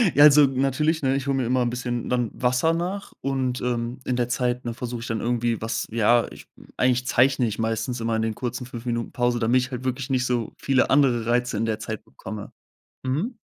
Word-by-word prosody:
Ja, 145 - +7
also, 150 -1 +8
natürlich, 140 +5 0
ne, 135 0 +2
ich 140 0 -3
hole 135 -1 +1
mir 130 - 0
immer 125 +1 +1
'n 120 - +1
bisschen 120 -1 -3
dann 120 -3 0
Wasser 125 +6 +1
nach 185 +4 -3
und, 130 -2 -1
ähm, 120 0 -2
in 125 - 0
der 120 0 0
Zeit, 125 -1 -1
ne, 120 - -2
versuche 120 0 -5
ich 120 - -6
dann 115 -3 -2
irgendwie 120 -1 0
was 110 - -2
ja, 115 +1 +3
ich - - -13 0.3
eigentlich 125 0 +2
zeichne 130 0 +3
ich 105 +1 -4
meistens 115 +2 -1
immer 115 0 0
in 110 - 0
den 110 -1 -1
kurzen 125 0 -4
5 120 -1 -8
Minuten 120 -1 -2
Pause, 120 -1 0
damit 120 +3 +3
ich 125 +1 -5
halt 125 0 -5
wirklich 130 +1 -3
nicht 130 -1 +1
so 120 -3 -1
viele 135 -1 +2
andere 130 -5 +3
Reize 120 -2 +1
in 115 - 0
der 110 -1 -1
Zeit 110 0 -5
bekomme, 110 -2 -9 0.5
mhm. 155 - -1
125 Hz, 225 wpm, -24 LUFS, 115-130 Hz, 0.5 s, also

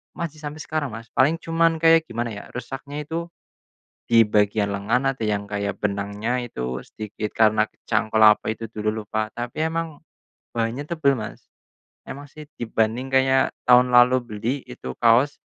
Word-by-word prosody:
masih 155 -2 -5
sampai 150 +1 -7
sekarang 155 -2 -2
Mas. 115 +1 -9
Paling 140 +6 +3
cuman 165 0 +1
kayak 165 0 +5
gimana 115 0 -3
ya, 105 - -7
rusaknya 140 +4 -6
itu 165 +3 -4 0.8
di 115 -1 +6
bagian 105 0 +1
lengan 115 +7 +1
ada 130 -4 -7
yang 105 -1 0
kayak 100 -1 -2
benangnya 105 +4 -1
itu 65 - -4
sedikit 105 0 -6
karena 110 -1 +4
kecangkul 110 0 -1
apa 105 0 +6
itu 115 -1 -8
dulu 110 0 -2
lupa. 110 +1 -2
Tapi 120 +5 -5
emang, 165 -2 -4 0.5
bahannya 115 +4 -2
tebel 155 -4 +1
Mas. 110 - -8 0.6
Emang 145 +1 -9
sih 155 +2 -11 0.2
dibanding 115 +2 -1
kayak 130 0 +2
tahun 125 0 +6
lalu 125 +1 +6
beli, 115 +1 -3
itu 65 - -7
kaos, 120 +5 +4
120 Hz, 155 wpm, -23 LUFS, 110-145 Hz, 0.8 s, di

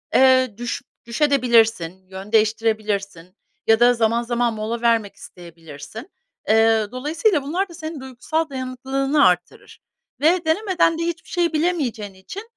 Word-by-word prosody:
eee, 260 -2 +5
düş 240 0 -4 0.2
düşebilirsin 235 - +2 0.2
de, 190 - -13
yön 195 +2 -8
değiştirebilirsin 215 -4 -1 0.3
ya 225 0 +5
da 240 +1 +5
zaman 230 0 +1
zaman 240 0 0
mola 220 +2 -4
vermek 230 -4 +1
isteyebilirsin. 165 - -12 0.4
Eee, 225 -1 +4
dolayısıyla 305 - 0
bunlar 360 +7 -2
da 340 - -12
senin 315 -2 -7
duygusal 275 +5 -3
dayanıklılığını 270 +2 0
artırır 180 -1 -3 0.4
ve 335 +3 +3
denemeden 335 -1 +1
de - - -1
hiçbir 340 0 -5
şeyi 345 -2 0
bilemeyeceğin 285 - -1
için, 190 - -9
240 Hz, 135 wpm, -21 LUFS, 220-305 Hz, 0.4 s, eee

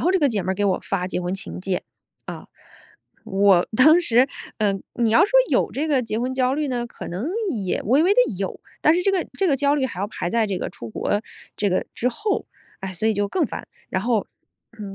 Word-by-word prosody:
后 360 +3 +2
这 380 - +2
个 290 - +4
姐 205 -6 -1
妹 190 - 0
儿 - - -3
给 205 +2 -1
我 190 -2 +2
发 185 -2 -2
结 180 - -2
婚 180 +1 -2
请 195 - -6
柬， 185 -1 -2 0.4
啊。 - - -7 0.8
我 195 -2 +4
当 310 +7 +7
时 255 -4 +3 0.3
呃， 210 -2 +2 0.2
你 235 -2 +1
要 230 - +5
说 410 - -4 0.2
有 - - +2
这 300 +4 -2
个 280 -4 +3
结 225 -3 -3
婚 250 +2 -1
焦 260 0 +1
虑 295 0 -1
呢， 240 -2 -2
可 - - -9
能 185 +9 -4 0.2
也 200 - -2
微 255 +8 +3
微 385 - +5
地 455 - +3
有， 195 -1 -4 0.2
但 310 - +5
是 355 - +1
这 395 - +3
个 385 -2 0
这 390 - +2
个 275 - +3
焦 285 +1 +2
虑 275 -3 +1
还 230 - -4
要 200 - -1
排 175 -4 -4
在 230 0 +2
这 195 -2 -2
个 - - -3
出 115 - -9
国 205 - -1 0.4
这 205 - +1
个 185 - 0
之 250 - 0
后。 405 - -2 0.3
唉， 190 -1 -5
所 200 +5 0
以 220 - +2
就 205 0 0
更 310 - 0
烦。 - - -7 0.2
然 185 - -1
后， 230 -2 +1 0.5
嗯， 200 -2 -7
225 Hz, 260 characters per minute, -23 LUFS, 195-280 Hz, 0.8 s, 当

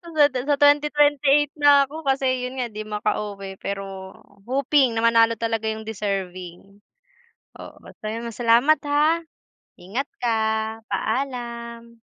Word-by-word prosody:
Sa 295 -1 +6
sa 270 +3 0
2028 290 0 +3
na 285 -2 +5
ako 315 +3 -9
kasi 270 -1 +1 0.2
'yun 255 +1 -5
nga, 245 - -1
di 215 -1 -7
makauwi 205 -2 -4
pero 195 -1 -6 0.3
hoping 270 -1 +2
na 225 - 0
manalo 230 0 +4
talaga 225 -1 -2
'yung 220 0 -7
deserving. 195 -2 -5 0.8
Oo, - - -10
maraming 230 +2 -7
salamat, 240 +6 +4
ha, 305 +3 +2 0.6
ingat 235 +10 -4 0.2
ka. 230 -2 +2 0.5
Paalam. 235 -3 -4
235 Hz, 120 wpm, -23 LUFS, 215-280 Hz, 0.8 s, Sa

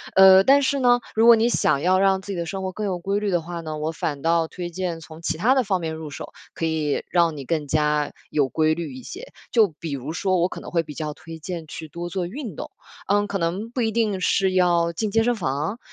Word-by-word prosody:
呃， 190 0 +8
但 275 +6 +5
是 280 0 +1
呢， 245 -1 +4 0.2
如 225 +1 +4
果 235 - +10
你 225 +1 +2
想 140 -11 +2
要 185 +3 +3
让 195 0 +3
自 200 - -7
己 190 - -4
的 170 - -2
生 190 +3 -5
活 190 - -2
更 210 +3 -4
有 190 -3 -1
规 195 +3 -1
律 210 -1 -1
的 175 -3 +1
话 170 +1 -6
呢， 155 -1 -5
我 155 +1 -2
反 150 -3 -4
倒 165 +1 +2
推 175 +1 -6
荐 175 -1 -4
从 160 0 -12
其 165 - -2
他 225 +10 +3
的 260 - +3
方 195 -4 0
面 160 -1 -3
入 160 -1 -7
手， 140 - -8 0.2
可 165 - -3
以 155 -2 -1
让 170 -3 +2
你 140 - -7
更 155 0 -1
加 150 0 +1 0.2
有 145 -3 +1
规 155 +1 +2
律 160 -4 -5
一 130 - -10
些。 - - -9 0.2
就 225 -3 +5
比 165 - -5
如 140 +2 -4
说 185 +1 0
我 175 0 +2
可 - - -7
能 - - -9
会 170 - +2
比 150 -1 -9
较 150 +1 -4
推 165 +2 -10
荐 165 0 -6
去 160 +1 -8
多 170 +3 -6
做 180 0 -2
运 230 - -7
动， - - -7 0.4
嗯， 205 +1 +2
可 200 - -2
能 185 +5 -2
不 245 - -2
一 225 -1 +1
定 215 -4 0
是 190 +1 +2
要 175 -2 +3
进 210 +4 -2
健 225 +2 +3
身 245 +1 +1
房。 155 - -2
175 Hz, 285 characters per minute, -23 LUFS, 160-200 Hz, 0.4 s, 果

